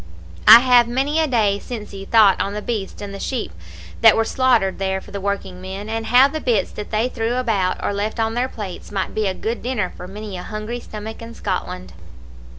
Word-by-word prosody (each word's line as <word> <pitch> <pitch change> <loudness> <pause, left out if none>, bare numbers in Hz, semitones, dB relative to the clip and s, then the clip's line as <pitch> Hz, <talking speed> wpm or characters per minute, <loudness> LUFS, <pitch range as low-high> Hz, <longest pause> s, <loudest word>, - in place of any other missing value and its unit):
I 225 +2 +11
have 245 -2 +5
many 270 +6 0
a 320 - +2
day 210 -6 +1
sinsyne 205 -5 -8
thought 215 -4 +5
on 200 +1 -2
the 210 - -3
beasts 210 -3 -4
and 200 -1 -7
the 195 - -7
sheep 250 0 -3 0.5
that - - +7
were 225 - +2
slaughtered 235 -8 +2
there 190 0 -1
for 200 - -14
the 200 -1 -5
working 190 -2 -3
men, 190 +3 -7
and 225 0 -3
how 250 +4 +6
the 310 +2 -5
bits 220 -7 +1
that 210 - -7
they 220 +2 +1
threw 235 -1 -2
about 215 -7 0
or - - 0
left 210 +3 -3
on 225 0 0
their 245 +2 -1
plates 205 -6 -8
might 195 -2 -2
be 215 -2 0
a 190 - -2
good 230 +4 -3
dinner 235 -7 -2
for 180 - -9
many 205 0 -7
a - - -6
hungry 215 +5 -5
stomach 220 -1 -8
in 230 0 -9
Scotland. 90 - -4
215 Hz, 220 wpm, -21 LUFS, 195-240 Hz, 0.5 s, I